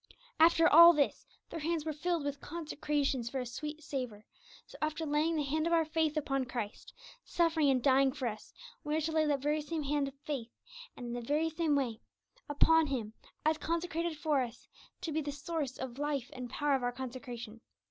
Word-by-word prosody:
After 330 0 +6
all 335 +3 +10
this, 290 -3 0 0.2
their 330 - -4
hands 320 0 -1
were 310 - -2
filled 335 +1 -1
with 285 -1 -3
'consecrations 295 -6 -2
for 265 - -3
a 250 - -3
sweet 300 +6 -6
savour,' 250 -8 -5 0.4
so, - - -15
after 310 +1 -1
laying 305 +2 +1
the 300 - +1
hand 310 +3 0
of 340 - +1
our 330 -1 +4
faith 315 -1 0
upon 275 -3 0
Christ, 235 -4 -5 0.3
suffering 325 -4 +2
and 255 -3 +2
dying 270 0 +4
for 260 -2 -3
us, 215 -1 -6 0.3
we 300 0 -1
are 315 - +1
to 320 +1 -1
lay 315 -1 +2
that 285 -2 +1
very 300 +1 +1
same 310 +1 -3
hand 285 0 0
of 275 - -8
faith, 265 -6 -3 0.5
and 245 - -7
in 240 - -4
the 245 - -3
very 300 +6 0
same 315 -2 +1
way, 240 -5 -1 0.5
upon 320 +2 +4
Him 235 -6 -3 0.3
as 310 0 +2
consecrated 335 -1 -2
for 295 -3 +1
us, 240 -1 -6 0.3
to 340 -3 -3
be 315 +1 0
the 290 -1 -3
source 290 -2 -4
and 255 -2 -5
life 290 -4 -2
and 250 -2 -6
power 290 +2 0
of 265 - +2
our 245 0 0
consecration. 245 -3 -7
295 Hz, 205 wpm, -32 LUFS, 260-315 Hz, 0.5 s, all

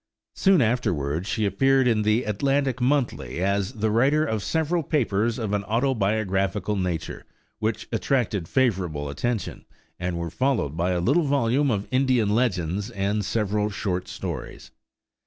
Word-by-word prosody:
Soon 190 -8 +4
afterward 90 - -1
she 110 -1 0
appeared 130 +7 +3
in 110 -3 +2
the 110 +3 +2
Atlantic 135 +4 0
Monthly 125 - 0
as 100 +3 0
the 110 -2 -1
writer 140 +7 +3
of 110 -7 -2
several 160 - 0
papers 115 -7 0
of 110 -4 -3
an 100 -1 0
autobiographical 105 -4 0
nature, 90 -4 -3 0.4
which 110 0 -2
attracted 115 - 0
favorable 90 - 0
attention, 105 - -3 0.4
and 90 -1 -2
were 85 -1 -4
followed 110 - 0
by 85 +2 0
a 90 -1 0
little 140 - +2
volume 140 0 +2
of 105 -4 -1
Indian 130 -5 +2
legends 100 -5 0
and 100 +2 -1
several 105 +1 0
short 95 -3 -3
stories. - - -6
110 Hz, 140 wpm, -25 LUFS, 95-130 Hz, 0.4 s, Soon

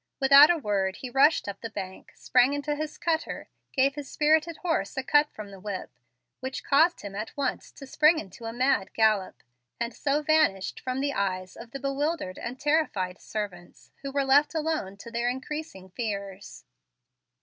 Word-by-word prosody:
Without 280 +2 +8
a 345 - +3
word 200 -8 -1
he 255 - -7
rushed 275 +2 +4
up 200 -1 -6
the 230 - -5
bank, 190 -3 -7
sprang 250 +2 +3
into 290 +1 -2
his 305 0 -5
cutter, 325 -1 -2 0.2
gave 275 0 +2
his 290 -2 -7
spirited 315 +2 +2
horse 320 - -1
a 265 - -1
cut 295 +2 +4
from 210 -2 -9
the 195 - -11
whip, 200 -1 -5 0.5
which 260 +1 -5
caused 320 +5 +3
him 200 -1 -7
at 215 +7 -6
once 275 -3 -2
to 275 - -11
spring 305 +4 +4
into 210 - -8
a 225 - -3
mad 250 -4 +1
gallop, 215 -4 +1 0.4
and 235 0 -2
so 290 +4 0
vanished 300 -12 +2
from 255 +1 -3
the 280 0 0
eyes 185 -3 -2
of 230 +1 -11
the 275 - -7
bewildered 275 - -2
and 250 +2 -6
terrified 275 - 0
servants, 190 -5 -7
who 275 0 -5
were 280 0 0
left 285 +4 +4
alone 310 -11 -2
to 230 +3 -11
their 235 0 0
increasing 260 - -6
fears. 200 -3 -5
260 Hz, 180 wpm, -27 LUFS, 200-295 Hz, 0.5 s, Without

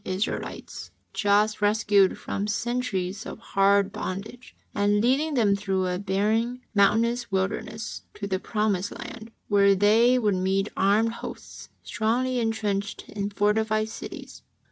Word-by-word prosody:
Israelites 190 +4 -4 0.2
just 210 0 +2
rescued 205 -2 +3
from 200 +1 -3
centuries 210 -4 -2
of - - -7
hard 200 -2 +2
bondage, 215 +4 -6 0.2
and 205 0 +2
leading 275 +7 +1
them 210 -5 +3
through 195 -2 -1
a 180 0 -1
barren, 215 +5 0
mountainous 230 +3 +2
wilderness, 215 +3 -3
to 205 - -5
the 190 -2 -1
promised 205 -3 -1
land, 225 -1 -9 0.2
where 200 -1 +4
they 225 +6 +4
would 215 -5 +2
meet 190 +2 0
armed 215 +4 +2
hosts, - - -9
strongly 245 +4 0
entrenched 210 -3 -2
in 200 -1 -3
fortified 215 +1 +1
cities. - - -9
210 Hz, 125 wpm, -26 LUFS, 200-225 Hz, 0.2 s, where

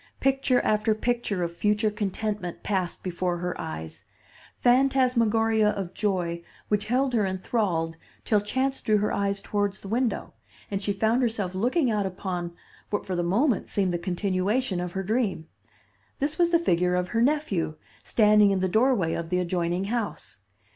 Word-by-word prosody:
Picture 270 -2 +2
after 215 0 +2
picture 220 -5 -1
of 170 0 -4
future 210 +2 +1
contentment 205 -3 -3
passed 190 -4 -2
before 180 -1 -1
her 180 +1 -3
eyes; 80 0 -7 0.5
phantasmagoria 235 -4 +3
of 195 -4 -3
joy 175 -5 -1 0.3
which 210 0 0
held 255 +3 +1
her 220 -3 +3
enthralled 185 -4 -1 0.3
till 210 -2 +3
chance 265 +6 -1
drew 215 -1 +2
her 210 +1 0
eyes 200 0 -1
towards 205 -2 -1
the - - -10
window, 235 +3 -1 0.4
and 195 -1 -1
she 205 - -1
found 220 +5 +1
herself 220 -6 -1
looking 245 - +1
out 205 -2 0
upon 180 -2 -4 0.4
what 205 - -2
for 185 - -3
the 175 - 0
moment 210 - +1
seemed 190 -3 0
the 175 - -1
continuation 190 +4 0
of 175 -1 -4
her 190 - -2
dream. 205 -6 -1 0.7
This 295 +4 -2
was 345 -1 +4
the 340 - +5
figure 180 - +1
of 180 0 -1
her 230 - 0
nephew, 240 - +1 0.3
standing 210 -2 +4
in 195 - +2
the 185 0 +1
doorway 220 -4 +2
of 170 -1 -4
the 180 - +1
adjoining 175 0 0
house. 220 +1 -4
205 Hz, 165 wpm, -26 LUFS, 180-230 Hz, 0.7 s, the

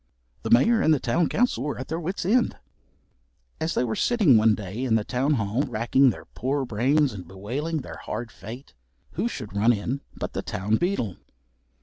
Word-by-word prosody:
The - - -4
Mayor 225 - +5
and 160 - +4
the 150 - +4
town 160 +8 +1
council 240 - +1
were 145 - -3
at 130 - -6
their 160 - -3
wits' 175 +2 -3
end. 235 +6 +2 1.0
As 160 +1 -1
they - - +2
were 110 -3 -1
sitting 210 - +4
one 110 0 +5
day 105 +5 -5
in 120 -4 +2
the 110 - +2
town 130 +6 0
hall 110 +2 0
racking 130 +1 +3
their 110 - -5
poor 135 +2 -2
brains, 130 +5 +2
and 95 -3 -8
bewailing 135 +12 -3
their - - -9
hard 115 +1 -5
fate, 120 +7 -10 0.4
who 230 - -1
should 105 - -6
run 110 +4 +4
in 120 +5 -2 0.2
but - - -4
the - - -2
town 105 +4 -1
beadle. 150 - -1
125 Hz, 195 wpm, -25 LUFS, 110-155 Hz, 1.0 s, Mayor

